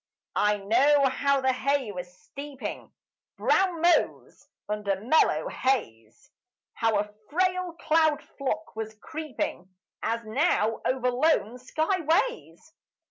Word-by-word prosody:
I 210 0 +3
know 265 +8 +4
how 280 +1 +1
the 260 0 +2
hay 275 -3 0
was 180 -2 -7
steeping, 280 -2 -7 0.5
Brown 365 -4 +2
mows 345 0 +1 0.2
under 210 -2 -1
mellow 310 - +2
haze; 115 - -2 0.4
How 225 -2 +1
a 210 0 -2 0.2
frail 365 +1 0
cloud 315 -2 +2 0.2
flock 220 -7 -3
was 220 0 -5
creeping 255 - -5 0.3
As 230 +1 -2
now 225 -2 +1
over 250 -1 +1
lone 250 -3 +1
sky 315 +8 -1
ways. 335 - -1
265 Hz, 115 wpm, -27 LUFS, 215-315 Hz, 0.5 s, know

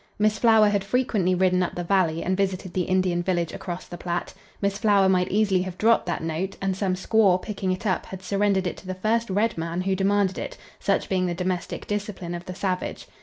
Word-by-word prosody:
Miss 215 0 +2
Flower 220 -3 +6
had 200 -1 0
frequently 205 -5 +1
ridden 185 0 +3
up 180 - -2
the 175 - -3
valley 170 -3 +1
and 185 - 0
visited 190 -2 -2
the 180 -2 0
Indian 185 -2 +1
village 175 -2 -1
across 175 -1 -6
the 175 - -8
Platte. 175 0 -3 0.3
Miss 200 0 -1
Flower 205 -3 +4
might 185 -1 +3
easily 200 -2 +2
have 185 -1 -5
dropped 225 -2 +3
that 170 - -2
note, 165 +4 -3
and 195 -1 -1
some 190 -1 0
squaw, 190 -1 +3
picking 195 -2 -3
it 185 +4 -4
up, 185 -4 0
had 190 0 -8
surrendered 195 0 +1
it 180 - -3
to 185 - -13
the 185 - -3
first 225 +4 0
red 205 0 +1
man 170 +2 -2
who 190 +1 0
demanded 195 0 +1
it, - - -6 0.2
such - - 0
being 185 -1 +1
the 175 - -2
domestic 180 0 -3
discipline 205 -4 -4
of 175 +1 -6
the 185 - -7
savage. 185 -1 -3
190 Hz, 220 wpm, -25 LUFS, 180-200 Hz, 0.3 s, Flower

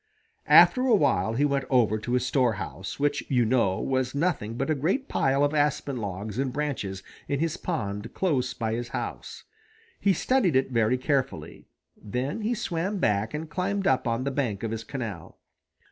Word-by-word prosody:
After 255 - +7
a 235 - +6
while 120 - +2
he 140 +5 +2
went 140 -2 0
over 115 -5 +3
to 120 +3 -4
his 125 0 +1
storehouse, 110 -7 -1
which, 145 0 +1
you 125 -3 +3
know, 110 -5 +2
was 130 0 -1
nothing 140 -9 -1
but 135 +5 -1
a - - +4
great 185 - -1
pile 135 +1 +1
of 145 +1 +1
aspen 145 -2 0
logs 100 +1 -4
and 135 -1 0
branches 125 -10 -3 0.2
in 140 - -1
his 165 +1 0
pond 105 - -4
close 140 -9 0
by 110 -2 -2
his 120 +1 -3
house. - - -6 0.6
He 200 - +3
studied 195 - +1
it 130 0 +2
very 115 +1 +2
carefully. 135 0 -2 0.3
Then 130 - -4
he 225 +3 0
swam 185 +1 -2
back 105 - 0
and 160 +2 -4
climbed 195 +4 -2
up 130 -4 +2
on 115 +2 0
the 140 - -1
bank 120 -8 -2
of 115 - -2
his 115 0 -4
canal. 110 - -6
130 Hz, 180 wpm, -26 LUFS, 115-150 Hz, 0.6 s, After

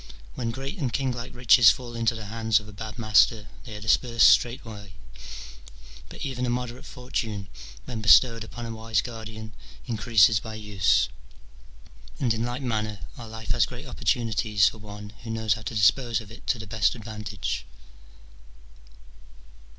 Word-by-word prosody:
When 115 - -3
great 135 - -5
and 135 -6 -1
kinglike 125 -2 -3
riches 120 -2 +7
fall 120 +2 -2
into 115 0 +1
the 110 -2 -7
hands 110 0 +1
of 105 - -13
a 105 - -11
bad 110 +2 -7
master, 110 -1 +3 0.2
they 110 -4 -8
are - - -6
dispersed 115 +2 +4
straightway, 110 -5 0 1.2
but - - -7
even 130 -2 -3
a - - -1
moderate 125 0 -4
fortune, 110 -6 -4 0.4
when 115 -3 -5
bestowed 115 +1 +6
upon 120 +2 -8
a 115 - -5
wise 110 -1 -1
guardian, 110 -2 -8 0.3
increases 110 -3 +4
by 110 0 -8
use: 105 -2 +2 1.1
and 120 -4 +2
in 115 0 -2
like 120 +3 -3
manner 110 -5 -2
our 120 - -9
life 110 0 -6
has 115 -3 +3
great 125 +4 -9
opportunities 110 -6 +1
for 110 - -3
one 105 0 -10
who 120 - -9
knows 110 -2 +1
how 110 - -7
to 110 +2 -6
dispose 115 +3 +3
of 110 -2 -11
it 115 - -14
to - - +1
the 110 - -8
best 105 +2 +1
advantage. 105 - -5
110 Hz, 160 wpm, -26 LUFS, 105-120 Hz, 1.2 s, riches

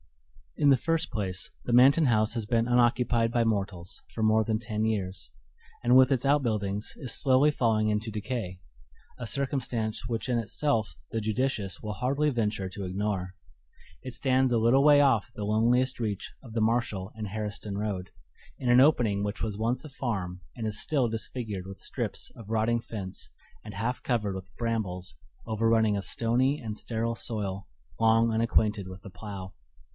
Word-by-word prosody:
In 145 - +4
the 135 - +6
first 165 +4 0
place 95 -3 -3
the - - -2
Manton 135 +5 +6
house 110 -2 +2
has 115 -3 -2
been 115 +1 +1
unoccupied 120 -1 +3
by 120 -1 +2
mortals 100 -5 -2
for 115 - -4
more 110 0 +4
than 110 0 0
ten 110 -1 -3
years, 95 - -2 0.5
and 120 +1 +4
with 130 +1 +7
its 130 -1 +1
outbuildings 110 -8 0
is 125 -5 -3
slowly 135 +2 +4
falling 110 -6 +1
into 105 +1 -1
decay 105 -4 -4 0.6
a 120 - -5
circumstance 125 -5 -1
which 115 0 -2
in 125 -2 +1
itself 115 0 0 0.2
the 115 - -1
judicious 110 -3 -1
will 105 0 -4
hardly 140 +7 +1
venture 105 -5 -1
to 100 +2 -7
ignore. 95 -1 -2 0.7
It 130 - -7
stands 130 -1 +2
a 120 - +3
little 120 +5 +4
way 145 -1 +7
off 125 -5 +3
the 105 - -4
loneliest 120 +5 +2
reach 105 -4 -3
of 115 -4 -11
the 115 - 0
Marshall 110 -4 0
and 110 -1 -5
Harriston 105 0 -4
road, 100 -3 -3 0.5
in 125 - -2
an 120 +1 +7
opening 120 -9 +3
which 105 +1 -3
was 105 -2 -2
once 120 +5 -1
a - - -8
farm 95 -10 -3 0.2
and 115 - -3
is 105 -1 -2
still 135 -6 +1
disfigured 110 -4 -4
with 95 - -8
strips - - -3
of 110 -2 -11
rotting 115 +1 +1
fence 100 -5 -6 0.3
and - - -9
half 115 +5 -2
covered 105 -6 -1
with 95 0 -9
brambles 105 -6 -3 0.3
overrunning 110 -1 +2
a 100 - -1
stony 125 +7 +1
and 110 -3 -5
sterile 115 +1 -2
soil 100 -4 -4 0.3
long 115 +1 +4
unacquainted 110 -3 +1
with 95 0 -9
the 100 - -10
plow. 100 -2 -8
110 Hz, 170 wpm, -28 LUFS, 105-125 Hz, 0.7 s, with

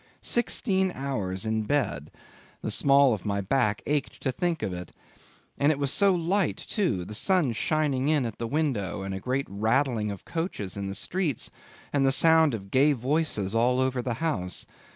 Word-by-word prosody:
Sixteen 190 -5 +1
hours 105 -9 -3
in 110 0 0
bed! 105 - -1 0.5
the - - -2
small 140 -2 +5
of 105 - -5
my 100 -1 -1
back 105 +1 0
ached 145 -1 -2
to 130 - +1
think 170 +4 -2
of 95 - -2
it. 90 0 -7 0.7
And 145 +2 +4
it 150 - -1
was 140 -1 +1
so 200 -2 +5
light 180 +4 0
too; 120 - -2
the 105 - -8
sun 175 - +2
shining 140 +1 0
in 150 -4 +2
at 115 -3 -6
the 115 - -2
window, 115 - -1
and 95 0 -4
a 95 - -4
great 130 +6 -2
rattling 110 +3 0
of 100 -2 -7
coaches 165 - -4
in 100 -1 -4
the 95 - -4
streets, 170 - -2 0.4
and 140 -1 +2
the 135 - +4
sound 160 -1 +5
of 100 -2 -9
gay 145 +3 +4
voices 130 -6 -1
all 125 +3 +2
over 130 -1 0
the 120 -1 -2
house. 105 - -2
130 Hz, 185 wpm, -27 LUFS, 105-155 Hz, 0.7 s, small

